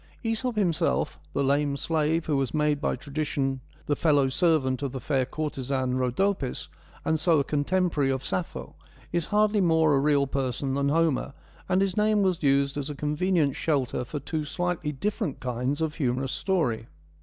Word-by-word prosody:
TEscrp 225 +2 -1
himself, 180 -7 0
the 140 - 0
lame 140 +1 +1
slave 160 +2 0
who 150 - 0
was 135 +1 -1
made 150 -1 +1
by - - 0
tradition 140 -2 -2 0.2
the 145 - +1
fellow 145 -4 +3
servant 140 -4 +2
of 140 -2 -2
the 130 - -3
fair 130 0 0
courtesan, 135 -4 -2
Rhodopis, 130 +4 0 0.4
and 160 0 +1
so 165 0 +3
a 140 - +3
contemporary 150 0 +1
of 130 0 -1
Sappho, 180 - -4 0.4
is 170 -1 0
hardly 210 0 +3
more 160 -3 +4
a 135 - +4
real 140 0 +3
person 135 0 -2
than 140 0 +1
Homer, 155 -3 +1 0.4
and 185 +1 +3
his 190 -2 -1
name 210 -1 +3
was 185 -3 +1
used 140 -1 +2
as 145 0 -3
a 145 - -5
convenient 150 0 +1
shelter 135 -6 0
for 145 +4 -5
two 155 +3 -3
slightly 175 0 -2
different 195 - -2
kinds 125 +4 -2
of 160 -1 0
humorous 130 -3 -1
story. 145 - 0
150 Hz, 170 wpm, -27 LUFS, 135-170 Hz, 0.4 s, more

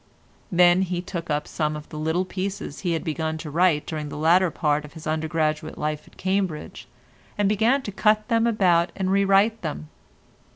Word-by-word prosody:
Then 175 0 +5
he 180 -2 -1
took 175 -2 -6
up 150 0 -1
some 150 -1 -2
of 150 0 -8
the 155 - -7
little 160 +4 0
pieces 190 -4 -5
he 175 -3 -1
had 165 - -2
begun 160 -1 -2
to 155 -1 -7
write 165 -2 +2
during 155 -2 -4
the - - -7
latter 170 +4 +4
part 150 -2 0
of 150 - -12
his 160 -1 -11
undergraduate 155 0 -1
life 150 0 -3
at - - -20
Cambridge, 190 -4 -2 0.5
and 205 -1 +2
began 225 +7 +2
to 205 - -5
cut 215 +2 +2
them 230 0 +2
about 180 -6 +3
and 190 -1 -1
re 200 0 +3
write 200 +3 +3
them. 155 -1 -5
175 Hz, 195 wpm, -24 LUFS, 155-195 Hz, 0.5 s, Then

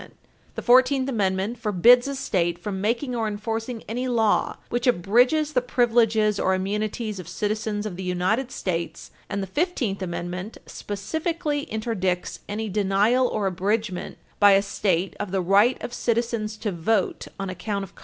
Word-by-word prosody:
[Footnote - - -15
7] - - -35 0.3
The - - -4
Fourteenth 260 +2 +4
Amendment 200 -1 0
forbids 235 +4 +5
a 280 - -3
state 175 -9 0
from 190 +2 -4
making 240 +5 -1
or 225 -2 0
enforcing 225 +2 -4
any 245 +4 -2
law 225 -4 +1
which 240 +2 -1
abridges 250 - +3
the 250 - +3
privileges 225 -4 +2
or 190 - +2
immunities 210 +2 -2
of 180 - -8
citizens 210 +3 -2
of 190 -5 -5
the - - -5
United 185 +8 0
States 170 -2 -4 0.2
and 200 - -2
the - - -5
Fifteenth 240 - -1
Amendment 180 +3 -5
specifically 295 - -3
interdicts 195 -5 -2
any 215 +2 -3
denial 210 +5 +2
or 210 -4 -2
abridgement 195 +1 -2 0.2
by 205 -1 +7
a 195 0 +4
state 195 -2 0
of 205 - -3
the 190 +1 0
right 200 +7 +4
of 240 - -5
citizens 230 -3 -1
to 210 -1 -2
vote 185 +6 0
on 195 -1 -3
account 200 +2 -3
of 195 - -10
color. - - -18
215 Hz, 165 wpm, -24 LUFS, 190-240 Hz, 0.3 s, by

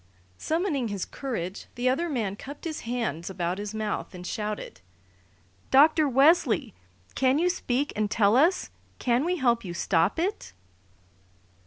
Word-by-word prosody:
Summoning 315 -6 0
his 200 -3 -3
courage, 200 -9 -5
the 245 +1 -1
other 290 +7 +1
man 220 -9 -2
cupped 280 +7 -10
his 315 -2 -3
hands 225 - -3
about 180 0 -2
his 210 +1 -5
mouth 215 -3 -3
and 180 0 -9
shouted: 210 - -4 0.9
"Dr. 305 +2 +5
Wesley! 275 0 +3 0.4
Can 260 +1 +2
you 355 +3 +2
speak 280 -4 -2
and 210 -1 0
tell 210 0 +3
us? 325 +8 +3 0.3
Can 245 +1 +1
we 355 +3 0
help 240 -7 +1
you 175 -3 -6
stop 170 +1 +1
it?" 360 - -2
245 Hz, 145 wpm, -27 LUFS, 205-295 Hz, 0.9 s, Dr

